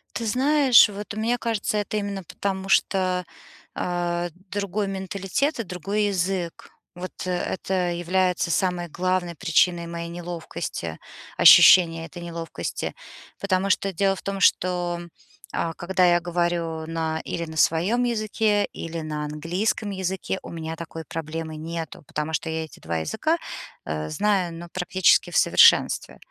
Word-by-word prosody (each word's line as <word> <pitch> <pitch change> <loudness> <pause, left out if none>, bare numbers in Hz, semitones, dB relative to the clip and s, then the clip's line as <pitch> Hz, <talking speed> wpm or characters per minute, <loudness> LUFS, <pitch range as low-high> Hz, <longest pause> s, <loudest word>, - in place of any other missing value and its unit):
Ты 230 - -2
знаешь, 265 0 +5
вот 205 0 -7
мне 230 +3 0
кажется, 225 -2 -1
это 210 +1 -2
именно 200 -2 -3
потому, 195 +2 -4
что, 185 -2 +2 0.5
а, 175 0 -2 0.2
другой 200 0 -2
менталитет 195 - -2
и - - 0
другой 195 +3 -2
язык. 185 -3 -2 0.3
Вот 180 +1 -6
это 180 0 -1
является 175 0 0
самой 180 -1 0
главной 185 +1 -1
причиной 170 -1 +2
моей 170 0 -5
неловкости, 170 - -5 0.4
ощущения 165 -3 +8
этой 170 +2 -10
неловкости. 170 -1 -5 0.5
Потому 195 0 +1
что 195 +1 +1
дело 195 +2 +1
в - - -10
том, 195 0 -4
что, 175 -2 +2 0.6
э, 165 -1 -1
когда 185 +1 +1
я 175 -1 +5
говорю 170 -2 -1
на 160 -1 -2
или 170 - -3
на 160 -1 -9
своём 180 +11 +2
языке, 215 -3 +1
или 165 0 -5
на 150 -1 -4
английском 175 +8 -2
языке, 190 0 -3
у - - -8
меня 160 -1 -5
такой 165 0 -7
проблемы 160 0 -5
нету, 165 -1 -6
потому 150 +1 -3
что 160 - -1
я 160 0 -2
эти - - -16
2 85 +1 -3
языка, 80 -1 0 0.5
э, 75 0 -3
знаю, 195 - +1
ну, 170 +1 -8
практически 185 0 +3
в - - -6
совершенстве. - - +5
180 Hz, 140 wpm, -24 LUFS, 165-195 Hz, 0.6 s, ощущения